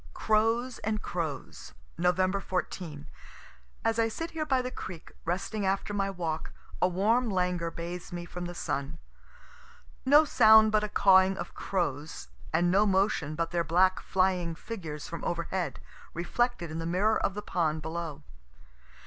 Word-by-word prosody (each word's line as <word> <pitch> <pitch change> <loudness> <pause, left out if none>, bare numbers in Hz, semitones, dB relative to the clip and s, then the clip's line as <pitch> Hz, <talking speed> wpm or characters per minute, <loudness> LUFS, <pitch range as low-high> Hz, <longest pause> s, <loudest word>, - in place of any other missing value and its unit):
CROWS 225 +3 +1
AND 215 0 -2
CROWS 160 - -5 0.2
Nov. 180 +1 +2 0.3
14. 175 -5 -4 0.8
As 225 0 +2
I 225 - +4
sit 330 +9 -5
here 315 -2 -3
by 260 -3 +2
the 250 - -4
creek, 175 -8 -8
resting 195 +5 -2
after 195 +2 0
my 195 -1 0
walk, 165 -4 -3 0.3
a 180 - +5
warm 220 +7 +2
languor 180 -3 0
bathes 170 +1 -6
me 175 -1 -5
from 175 +1 -6
the 175 0 -6
sun. 140 -4 -3 1.1
No 295 +4 +6
sound 220 -5 +7
but 215 0 +3
a 210 - -2
cawing 190 -1 +5
of - - -6
crows, 155 - -3 0.2
and 175 +2 +2
no 205 +3 +4
motion 190 -6 +1
but 165 +1 -2
their 170 -1 +1
black 185 +4 +3
flying 185 -3 0
figures 160 -7 -7
from 170 -2 -6
over 170 -1 -1
head, 170 -6 -3 0.4
reflected 175 0 -1
in 160 - -4
the 165 - -3
mirror 205 +6 +2
of 195 - 0
the 210 - -5
pond 160 -5 -1
below. 160 -2 -5
180 Hz, 155 wpm, -29 LUFS, 170-215 Hz, 1.1 s, sound